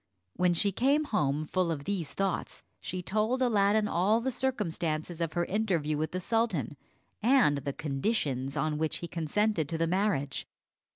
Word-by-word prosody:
When 180 -1 +2
she 200 +4 +3
came 275 - +2
home, 155 - 0
full 180 +2 0
of 150 -4 -2
these 175 -3 -3
thoughts, 195 -2 -2 0.2
she 180 0 -5
told 215 +7 0
Aladdin 210 -3 +3
all 200 +6 +2
the 260 +3 -1
circumstances 175 -10 -2
of 165 -2 -1
her 175 -1 0
interview 180 -8 0
with 155 +1 -1
the 185 - -3
sultan, 185 - 0 0.5
and 235 - +4
the 140 0 -4
conditions 140 - -1
on 150 +1 0
which 160 -1 0
he 170 - -6
consented 165 0 0
to 165 - -2
the 165 - +1
marriage. 165 -7 0
175 Hz, 165 wpm, -30 LUFS, 155-215 Hz, 0.5 s, and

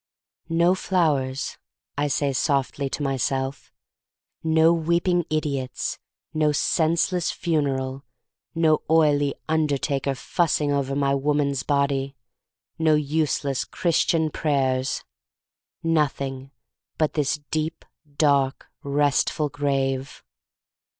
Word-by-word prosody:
No 170 +2 +3
flowers," 150 -8 0 0.4
I 145 +1 0
say 140 0 0
softly 140 0 0
to 145 - -3
myself, 135 0 -2 0.7
no 160 +1 +4
weeping 170 +1 +1
idiots, 140 -4 -2 0.3
no 155 -1 +2
senseless 170 +4 +1
funeral, 135 -5 -1 0.5
no 160 -2 +3
oily 145 -3 +3
undertaker 145 -3 0
fussing 150 +1 0
over 140 -1 0
my 140 -1 +1
woman*s 140 -1 +1
body, 140 -1 0 0.6
no 160 -1 +4
useless 150 -2 0
Christian 165 -2 +1
prayers. 135 -4 0 0.8
Nothing 140 -4 -1 0.5
but 155 -2 +1
this 150 -1 0
deep 155 +1 -2 0.3
dark 140 -3 +2
restful 145 +2 +1
grave." 135 -2 -2
145 Hz, 90 wpm, -24 LUFS, 135-160 Hz, 0.8 s, no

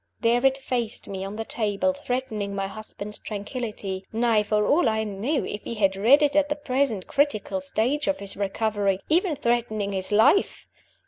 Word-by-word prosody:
There 240 +1 +3
it 270 0 +4
faced 245 -3 -3
me 190 -1 -5
on 195 +2 -5
the 225 +1 -4
table, 220 +6 0
threatening 245 -7 -3
my 195 0 -1
husband's 210 0 -8
tranquillity; 205 -3 -5
nay, 225 -1 +3
for 210 0 +1
all 290 -5 +3
I 220 0 0
knew 220 +8 -1
(if 205 - -5
he 230 - -6 0.2
read 270 +8 +6
it 290 -1 +2
at 295 -1 +3
the 295 - 0
present 260 -8 -1
critical 285 -1 0
stage 280 +1 0
of 290 - +1
his 200 -1 -6
recovery) 200 -1 0
even 335 0 +2
threatening 235 -5 0
his 190 0 -2
life! 220 - +3
225 Hz, 175 wpm, -25 LUFS, 205-270 Hz, 0.2 s, read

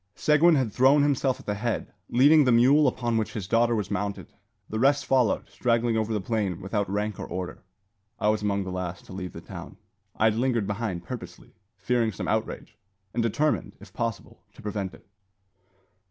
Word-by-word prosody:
Seguin 155 +2 +4
had 130 -7 0
thrown 135 +3 +5
himself 135 -2 +1
at - - -14
the 105 - -1
head, 110 +3 -3 0.2
leading 145 +5 +6
the 125 - +3
mule 135 +5 +5
upon 120 -2 0
which 110 - -2
his 105 -6 -5
daughter 115 +2 +3
was 105 -3 -3
mounted. 100 0 -3 0.3
The 110 - -3
rest 140 +3 +3
followed, 130 -5 +2
straggling 115 -1 +1
over 110 0 0
the 110 - 0
plain 100 -3 -2
without 100 0 -2
rank 105 0 -2
or - - -5
order. 90 -1 -5 0.6
I 105 - +2
was 110 0 +1
among 100 -1 0
the 95 - -5
last 90 -1 -5
to - - -11
leave 90 -1 -6
the - - -8
town. - - -9 0.4
I 110 - +1
had 110 - +4
lingered 120 -3 +1
behind 100 -4 -3
purposely, - - -9 0.2
fearing 115 +3 +1
some - - -5
outrage, 110 -1 -3 0.3
and 120 - 0
determined, 115 -2 0
if 100 -1 -15
possible, 115 -2 -4
to - - -13
prevent 100 -3 -4
it. - - -20
110 Hz, 190 wpm, -26 LUFS, 100-125 Hz, 0.6 s, leading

